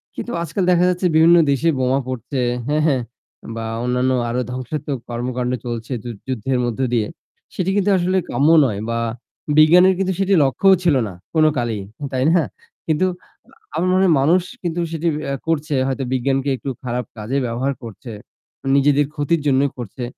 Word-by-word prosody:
কিন্তু 240 - -5
আজকাল 185 +3 -2
দেখা 175 0 +4
যাচ্ছে 180 0 +1
বিভিন্ন 165 +2 +6
দেশে 140 +5 +2
বোমা 130 +1 +2
পড়ছে, 130 +2 -4 0.3
হ্যাঁ, 150 +1 +1
হ্যাঁ, 135 -4 +2 0.5
বা 115 0 -4 0.2
অন্যান্য 125 +1 +1 0.2
আরো 125 +2 -1
ধ্বংসাত্মক 130 +3 -4
কর্মকাণ্ড 125 +1 -2
চলছে 120 +1 -5
যুধ 120 -4 -7
যুদ্ধের 130 0 -1
মধ্য 120 -1 -3
দিয়ে 110 -3 +1 0.5
সেটি 185 0 -1
কিন্তু 205 0 +2
আসলে 185 +1 +1
কাম্য 145 +3 +2 0.2
নয় 105 -6 -2
বা 115 0 -1 0.6
বিজ্ঞানের 175 +5 +7
কিন্তু 190 0 0
সেটি 195 0 +2
লক্ষ্যও 190 +9 +4
ছিল 165 -5 +3
না 95 - -8 0.2
কোন 155 -1 +4
কালেই 115 -4 -1 0.3
তাই 130 0 +1
না? 175 - +4 0.4
কিন্তু 160 +3 +2 0.7
আমার 180 - 0
মনে 185 - +3
হয় 175 - +4
মানুষ 170 +7 +4 0.2
কিন্তু 175 0 -2
সেটি 165 +1 -2 0.2
অ্যা 140 - -2
করছে 155 -2 -1
হয়তো 135 0 -2
বিজ্ঞানকে 135 +2 0
একটু 140 - -6
খারাপ 125 -1 -3
কাজে 110 +6 -2
ব্যবহার 125 +4 -1
করছে 115 +2 -9 0.6
নিজেদের 145 +1 +3
ক্ষতির 150 +2 0
জন্যই 140 0 +3
করছে। 120 +1 -7
140 Hz, 165 wpm, -20 LUFS, 125-165 Hz, 0.7 s, বিজ্ঞানের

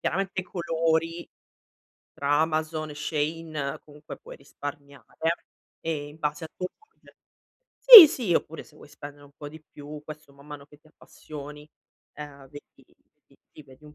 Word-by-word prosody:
Chiaramente, 190 +1 -2
i - - -9
colori 165 -1 -2 0.9
tra 145 +1 0
Amazon 155 -1 -2
e 145 - -11
Shein, 155 -1 -4
comunque, 150 0 -12
puoi - - -13
risparmiare, 140 0 -10 0.7
ehm, 155 -3 -4
in 150 +2 -17
base 150 +1 -3
a 160 - -6
tuo 180 - -4
budget. 435 - -25 0.6
Sì, 445 -11 +12
sì, 235 - -2
oppure 160 0 -3
se 150 - -22
vuoi - - -16
spendere 145 0 -12
un 140 - -20
po' 145 - -9
di 155 +1 -14
più, 150 0 -12
questo 155 -2 -12
man 140 +1 -19
mano 145 -1 -11
che 150 0 -20
ti 155 - -25
appassioni, 150 -1 -12 0.5
ehm, 140 -2 -11
vedi 145 +1 -16 0.4
ti - - -28
ti - - -15
vedi 135 +1 -20
un 150 0 -15
150 Hz, 165 wpm, -25 LUFS, 145-160 Hz, 0.9 s, Sì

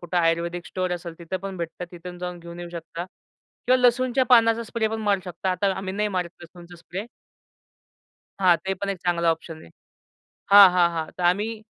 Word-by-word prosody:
कुठं 175 +1 -4
आयुर्वेदिक 170 +1 0
स्टोअर 185 -1 -2
असेल, 170 -1 -5
तिथं 170 +2 -4
पण 195 -1 -5
भेटतं. 170 +1 -5
तिथून 175 +1 -9
जाऊन 180 0 -5
घेऊन 170 0 -10
येऊ 175 - -7
शकता 170 0 -6 0.6
किंवा 255 +1 +5
लसूणच्या 255 +1 +3
पानाचा 230 -1 +5
स्प्रे 220 0 -1
पण 220 0 -4
मारू 205 -3 +1
शकता. 185 +1 -3
आता 195 +1 +1
आम्ही 190 0 -4
नाही 210 +1 0
मारत 180 -3 -2
लसूणचा 175 +1 -13
स्प्रे. 185 +5 -7 1.3
हां. 180 -3 +5
ते 190 0 -1
पण 200 +2 -5
एक 195 - -4
चांगला 170 -1 +1
ऑप्शन 165 0 -5
आहे. - - -14 0.8
हां, 200 -2 +10
हां, 175 -1 +4
हां. 160 -1 -3
तर 180 - -3
आम्ही 210 +5 +1
180 Hz, 190 wpm, -24 LUFS, 170-200 Hz, 1.3 s, हां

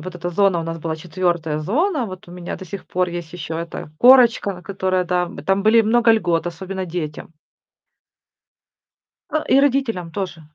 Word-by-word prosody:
вот 180 +3 -8
эта 175 0 -4
зона 190 -1 +2
у - - -3
нас 165 0 -5
была 160 0 -3
4 170 -2 -1
зона. 270 - 0
Вот 185 -2 -10
у - - -11
меня 180 -1 -6
до 190 - -9
сих 195 +2 -8
пор 180 0 0
есть 175 -2 -6
ещё 160 -2 -5
эта 170 -2 -6
корочка, 235 -7 +5
которая, 185 -1 -1
да, 180 0 0 0.2
там 195 +1 +2
были 220 +2 +5
много 230 +1 +4
льгот, 175 -6 +1
особенно 190 +2 -5
детям. 165 -2 -5 2.0
Э, 310 - 0
и 270 - +5
родителям 245 -11 0
тоже. 180 -2 -4
180 Hz, 170 wpm, -21 LUFS, 170-210 Hz, 2.0 s, корочка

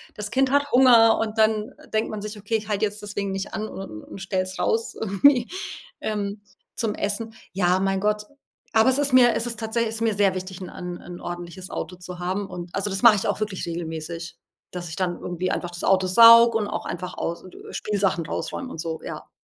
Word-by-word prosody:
das 210 -1 -5
Kind 265 0 +2
hat 285 0 +2
Hunger, 240 -3 +6
und 220 0 -2
dann 220 +2 +2 0.2
denkt 220 - +1
man 215 -1 -5
sich: 210 0 -6
„Okay, 205 +3 -2
ich 215 0 -9
halt 205 -2 -1
jetzt 210 0 -1
deswegen 200 -1 -3
nicht 195 0 -4
an 215 0 -3
un 105 - -8
und - - -10
stell's 190 -1 -2
raus 225 +1 0
irgendwie 235 +5 +4 0.5
ähm, 205 -1 -3 0.3
zum 220 -3 -1
Essen.” 220 +2 -3 0.2
Ja, 180 -1 +2
mein 195 0 +1
Gott. 210 0 +1 0.5
Aber 220 +3 +5
es 260 - +2
ist 285 -2 +1
mir 245 -2 +7
es 230 - -1
ist 235 -1 -4
tatsä 225 +1 -1
ist 225 0 -2
mir 225 -3 +1
sehr 195 -2 +3
wichtig, 185 0 -6
'n- 185 - -6
'n 180 0 -6
'n 175 0 -9
ordentliches 175 +1 -7
Auto 180 - -5
zu 180 0 -8
haben. 190 +3 -2
Und 175 -2 -8
also 195 +1 -1
das 195 0 -2
mache 230 -3 +9
ich - - -2
auch 205 - -1
wirklich 205 -3 -3
regelmäßig, 165 0 -5 0.3
dass 175 -1 -6
ich 160 - -6
dann 180 -2 -1
irgendwie 180 +1 -2
einfach 175 - -2
das 175 - -7
Auto 190 -1 +3
sauge 230 +3 +8
und 210 - -2
auch - - -4
einfach 180 +1 -5
aus 170 0 -3
äh, 185 - -12
Spielsachen 195 -5 0
rausräume 260 - -4
und - - -8
so, 160 -2 -4
ja. - - -7
200 Hz, 220 wpm, -24 LUFS, 180-220 Hz, 0.5 s, mache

